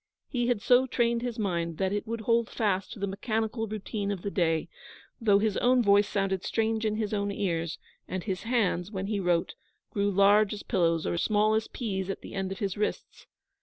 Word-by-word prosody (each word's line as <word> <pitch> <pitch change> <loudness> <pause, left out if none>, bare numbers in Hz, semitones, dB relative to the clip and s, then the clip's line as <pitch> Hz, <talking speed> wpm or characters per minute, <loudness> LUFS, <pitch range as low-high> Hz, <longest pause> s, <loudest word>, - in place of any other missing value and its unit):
He 240 -2 0
had 240 -5 0
so 255 +1 +5
trained 235 -1 +1
his 245 -1 -3
mind 170 -6 -1
that 190 0 0
it 205 +2 -2
would 230 0 -3
hold 230 0 +2
fast 195 -4 -1
to - - -8
the 200 - -1
mechanical 220 +3 -2
routine 210 -1 -4
of 195 -3 -3
the 200 - -2
day, 165 -4 +1 0.5
though 205 -3 +5
his 210 0 +1
own 250 0 +4
voice 205 0 +5
sounded 195 -2 -1
strange 225 0 0
in 215 - -1
his 215 -1 -2
own 200 -1 0
ears, 170 -5 -2 0.3
and 185 -1 -4
his 190 -4 -3
hands, 210 -6 0
when 190 -2 -4
he 205 0 -1
wrote, 175 -3 +1 0.4
grew 200 0 +1
large 200 +2 +4
as 205 - -8
pillows 165 -3 +1
or 170 - -1
small 215 +3 +2
as 220 0 0
peas 195 -6 -3
at 195 - -4
the - - -10
end 195 -1 -2
of 195 - -4
his 200 -4 -2
wrists. 210 - -3
205 Hz, 210 wpm, -28 LUFS, 190-220 Hz, 0.5 s, so